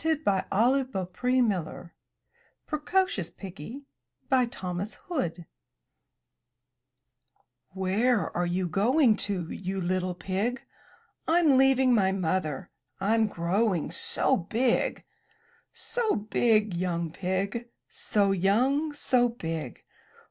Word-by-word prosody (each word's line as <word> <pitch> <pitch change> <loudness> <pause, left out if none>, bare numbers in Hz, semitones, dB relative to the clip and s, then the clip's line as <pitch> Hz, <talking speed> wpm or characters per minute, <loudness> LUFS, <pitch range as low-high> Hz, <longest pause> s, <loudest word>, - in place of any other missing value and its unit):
75 300 -12 +1
MY 250 +7 +3
BOOK 185 -4 -4
HOUSE 230 -10 0 0.7
PRECOCIOUS 305 - 0
PIGGY 195 - -9 0.7
Thomas 190 -3 -5
Hood 180 - -3 2.3
"Where 205 +5 +1
are 175 0 0
you 180 +1 -1
going 225 - +3
to, 190 -6 -1
you 190 0 -4
little 185 0 -1
pig? 195 +8 -2 0.6
'Tm 325 -4 +4
leaving 265 -1 +4
my 195 -4 +3
Mother, 180 -6 -2 0.3
Fm 220 +1 +2
growing 180 +1 0
so - - +2
big!'* 230 +8 0 0.7
''So 460 -2 0 0.2
big, 215 -4 +3
young 170 -2 -2
pig, 195 +6 -3 0.2
So 200 -2 0
young, 250 - +2
so 250 -4 +2
big! 165 - -6
200 Hz, 95 wpm, -27 LUFS, 180-250 Hz, 2.3 s, Tm